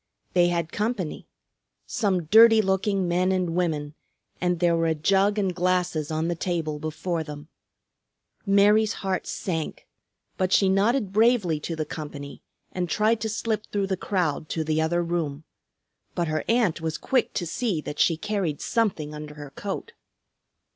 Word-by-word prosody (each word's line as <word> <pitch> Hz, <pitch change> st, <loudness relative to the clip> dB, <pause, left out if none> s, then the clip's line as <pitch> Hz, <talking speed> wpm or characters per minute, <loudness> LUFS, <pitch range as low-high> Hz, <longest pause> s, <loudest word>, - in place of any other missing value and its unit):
They 175 Hz, -1 st, +5 dB
had 170 Hz, -2 st, -1 dB
company; 210 Hz, -6 st, -3 dB, 0.6 s
some 190 Hz, -5 st, 0 dB
dirty 225 Hz, +5 st, +7 dB
looking 195 Hz, -1 st, +1 dB
men 180 Hz, +2 st, +2 dB
and 185 Hz, -2 st, 0 dB
women, 155 Hz, -4 st, -1 dB, 0.5 s
and 180 Hz, -1 st, +1 dB
there 170 Hz, -1 st, +3 dB
were 165 Hz, 0 st, +1 dB
a 160 Hz, -, +1 dB
jug 195 Hz, +6 st, +2 dB
and 195 Hz, -3 st, 0 dB
glasses 180 Hz, -4 st, 0 dB
on 160 Hz, +1 st, -1 dB
the 175 Hz, -, 0 dB
table 165 Hz, -3 st, -2 dB
before 160 Hz, +2 st, -3 dB
them. 150 Hz, 0 st, -9 dB, 0.9 s
Mary's 205 Hz, +1 st, +4 dB
heart 190 Hz, -1 st, -1 dB
sank, 160 Hz, -5 st, -4 dB, 0.5 s
but 185 Hz, 0 st, 0 dB
she 195 Hz, -1 st, +4 dB
nodded 205 Hz, +2 st, +2 dB
bravely 215 Hz, -7 st, +3 dB
to 165 Hz, +2 st, -4 dB
the 155 Hz, -1 st, -2 dB
company 145 Hz, -3 st, -7 dB, 0.3 s
and 180 Hz, -2 st, -3 dB
tried 215 Hz, +4 st, +2 dB
to 220 Hz, -, -1 dB
slip 220 Hz, 0 st, -2 dB
through 200 Hz, -1 st, -1 dB
the 190 Hz, 0 st, -1 dB
crowd 175 Hz, -6 st, -1 dB
to 160 Hz, -, -1 dB
the 155 Hz, 0 st, 0 dB
other 175 Hz, +2 st, +1 dB
room. 160 Hz, -4 st, -2 dB, 0.7 s
But 170 Hz, -1 st, 0 dB
her 155 Hz, 0 st, -1 dB
aunt 225 Hz, -9 st, +2 dB
was 160 Hz, 0 st, -2 dB
quick 255 Hz, +8 st, 0 dB
to 175 Hz, -, -1 dB
see 195 Hz, +1 st, -1 dB
that 150 Hz, -, -7 dB
she 165 Hz, -, +3 dB
carried 185 Hz, -6 st, -2 dB
something 190 Hz, -10 st, -1 dB
under 150 Hz, 0 st, -8 dB
her 145 Hz, -2 st, -9 dB
coat. 205 Hz, -, -5 dB
175 Hz, 160 wpm, -25 LUFS, 160-200 Hz, 0.9 s, dirty